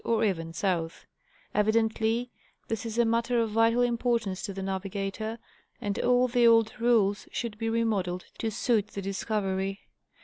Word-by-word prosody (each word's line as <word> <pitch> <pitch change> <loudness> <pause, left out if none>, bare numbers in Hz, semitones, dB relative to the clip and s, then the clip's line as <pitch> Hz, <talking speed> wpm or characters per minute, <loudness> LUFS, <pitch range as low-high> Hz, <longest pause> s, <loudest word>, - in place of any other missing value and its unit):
or 225 -1 +1
even 165 -6 -1
South: 165 -1 -2 0.5
evidently 225 +2 +1 0.4
this 225 +1 -2
is 225 0 -5
a 235 - +4
matter 230 +1 +1
of 225 -2 0
vital 230 +2 +3
importance 235 -5 0
to - - -4
the 195 0 -5
navigator, 195 +3 -3 0.4
and 205 -4 -2
all 250 0 +3
the 240 -1 +4
old 225 -1 +5
rules 220 -4 +2
should 235 -3 -3
be 225 0 -1
remodeled 205 -6 0
to 225 - -1
suit 215 -1 +1
the 200 - -6
discovery. 195 0 -2
220 Hz, 150 wpm, -28 LUFS, 195-230 Hz, 0.5 s, old